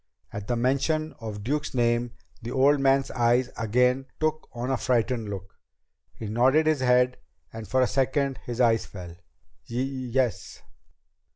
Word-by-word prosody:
At 105 0 -6
the 120 - 0
mention 140 +6 0
of 105 -3 -6
Duke's 145 +4 -2
name 120 0 +1 0.3
the 115 - -6
old 135 +3 +3
man's 135 0 +2
eyes 120 +1 +2
again 125 +4 +1
took 155 0 -1
on 120 +2 -3
a 130 - +1
frightened 120 -3 0
look. 95 -1 -8 0.6
He 110 - -7
nodded 130 +8 +3
his 155 -2 +2
head 125 0 +3 0.4
and 110 -1 -7
for 130 +6 +2
a - - +5
second 135 +1 0
his 120 0 -7
eyes 115 -3 +3
fell. 90 -3 -9 0.6
"Y 115 - -6
yes." 130 -3 -2
125 Hz, 155 wpm, -26 LUFS, 115-135 Hz, 0.6 s, a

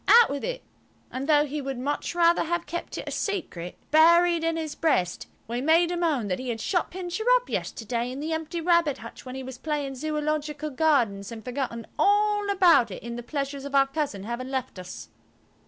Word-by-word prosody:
Out 470 -6 +7
with 280 0 -3
it." - - -3 0.5
And 270 +4 -4
though 295 -1 +5
he 295 +1 -4
would 270 -1 -4
much 285 +6 -2
rather 340 0 +4
have 345 +1 -1
kept 345 - -5
it - - -6
a - - -3
secret, 250 - -3
buried 340 +2 +5
in 330 0 0
his 315 -2 -3
breast, 185 - 0 0.2
we 240 +2 -2
made 330 +4 +4
him 350 0 -1
own 285 -10 +1
that 180 -2 -1
he 255 -1 -5
had 225 -1 -2
shut 355 - 0
Pincher 365 +3 -4
up - - 0
yesterday 235 +2 -2
in 260 - -6
the 315 +2 -2
empty 320 +1 -3
rabbit 340 -4 +3
hutch - - -11
when 255 - -6
he 265 - -5
was 260 -1 -8
playing 295 -3 -2
Zoological 300 +1 -2
Gardens 245 -9 +1
and 220 -2 -8
forgotten 245 -3 -3
all 415 0 +3
about 360 -10 +5
it - - -8
in 235 0 -5
the 240 - -5
pleasures 275 +2 -4
of 280 0 -4
our 275 0 +6
cousin 275 -8 -3
having 235 +4 -4
left 260 -7 -3
us. 180 - -9
295 Hz, 205 wpm, -26 LUFS, 255-335 Hz, 0.5 s, Out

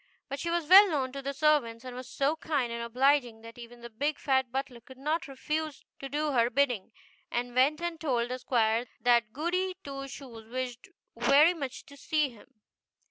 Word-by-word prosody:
But 275 +1 -4
she 340 - -3
was 340 -2 -1
well 390 +3 +9
known 270 -5 -1
to 275 +1 -6
the 275 +1 -3
servants, 275 -5 +1
and 250 -1 -7
was 255 0 -8
so 280 +4 0
kind 285 -7 -2
and 235 - -4
obliging, 245 -1 +1
that 230 +1 -12
even 240 0 -12
the 235 - -8
big 285 +6 -1
fat 265 -3 +1
butler 265 -2 -4
could 260 +3 -15
not 305 +5 -2
refuse 300 +2 -4
to 275 - -6
do 300 +2 -1
her 235 -3 +3
bidding, 245 -5 0 0.4
and 245 0 -3
went 275 +5 +3
and 345 -2 -3
told 245 -6 0
the 255 0 -4
squire 235 -1 +1
that 235 -3 +3
Goody 365 +7 -1
Two 275 -1 -6
Shoes 240 -5 -10
wished 255 +5 -5 0.3
very 300 +5 +5
much 275 -7 -6
to 285 -3 -14
see 300 +1 0
him. 230 -4 -17
270 Hz, 195 wpm, -29 LUFS, 240-300 Hz, 0.4 s, well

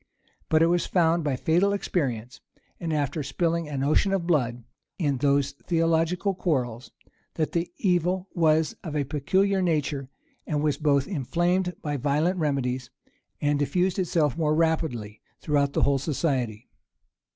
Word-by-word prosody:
But 160 0 +4
it - - +6
was 175 +1 +1
found 170 -2 +2
by 145 -3 0
fatal 175 +9 +2
experience, 130 - -2 0.4
and 165 -2 -3
after 150 0 -1
spilling 165 +2 -1
an 135 -2 -2
ocean 155 +7 +2
of 185 -3 0
blood 125 -8 0 0.3
in 145 -7 0
those 140 +1 +2
theological 165 +5 0
quarrels, 130 -10 -2 0.5
that 155 -2 -1
the 170 +1 -1
evil 180 0 +1
was 160 -2 +2
of 155 -3 -5
a 145 - +1
peculiar 190 +8 +1
nature, 150 -5 -1 0.4
and 150 -1 -1
was 150 -2 +1
both 140 -3 +2
inflamed 180 +2 0
by 145 -1 -2
violent 150 +7 +1
remedies, 130 -4 -1 0.5
and 145 -1 +1
diffused 180 +6 +1
itself 160 -6 +1
more 155 -2 +1
rapidly 155 -10 -1 0.2
throughout 145 -2 +1
the - - +1
whole 140 -1 +3
society. 130 -6 -2
155 Hz, 145 wpm, -26 LUFS, 140-170 Hz, 0.5 s, it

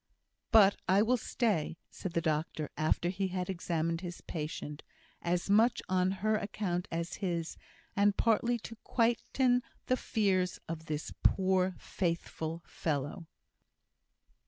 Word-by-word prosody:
"But 205 -4 +7
I 195 +3 +6
will 245 +3 +3
stay," 215 -9 0
said 185 - -5
the 170 - +1
doctor, 155 -1 -1
after 155 +2 +1
he 190 +1 -1
had 185 0 -2
examined 165 -2 -1
his 175 -2 -6
patient; 150 -2 -5 0.4
"as 175 0 0
much 225 +4 +4
on 185 0 +3 0.2
her 215 0 +4
account 190 -4 -2
as 170 +1 -3
his! 170 -4 -1 0.4
and 205 0 +3
partly 235 +2 +3
to 230 0 -9
quieten 245 +2 +2 0.2
the 255 - +2
fears 190 -7 +1
of 160 0 -5
this 150 0 -3
poor, 185 -1 +3
faithful 170 -2 -3
fellow." 150 +2 -3
185 Hz, 130 wpm, -32 LUFS, 165-210 Hz, 0.4 s, But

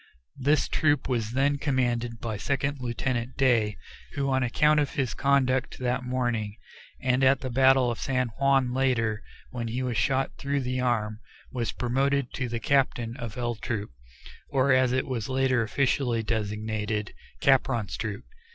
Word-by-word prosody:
This 145 +2 +2
troop 150 -3 +1
was 115 -4 -1
then 140 +2 +2
commanded 120 -4 0
by 115 -2 -3
Second 140 +5 -1
Lieutenant 120 +1 -2
Day, 115 -6 +2 0.4
who 140 -1 -1
on 130 0 +2
account 150 +5 +3
of 145 -2 -1
his 130 -4 0
conduct 135 -1 +1
that 125 0 -1
morning 120 -4 -2 0.4
and 130 0 +1
at 130 0 +4
the 130 - -4
battle 130 0 +4
of 115 - -5
San 125 -2 0
Juan 135 +1 +2
later, 120 -5 +1 0.3
when 120 -2 -4
he 120 +3 -2
was 125 -3 -2
shot 135 +4 0
through 140 0 -1
the 130 0 -2
arm, 110 -4 0 0.3
was 120 -3 -2
promoted 135 +2 0
to 125 -2 -3
be 115 0 -3
captain 120 -4 +1
of 120 -3 -6
L 120 -1 -1
Troop, 110 - -4 0.6
or, 135 0 +3
as 130 -1 +3
it 130 +1 0
was 125 -4 -3
later 130 -2 +2
officially 120 0 0
designated, 105 -1 -2 0.3
Capron's 130 -6 +2
troop. 105 - -5
125 Hz, 160 wpm, -27 LUFS, 115-135 Hz, 0.6 s, at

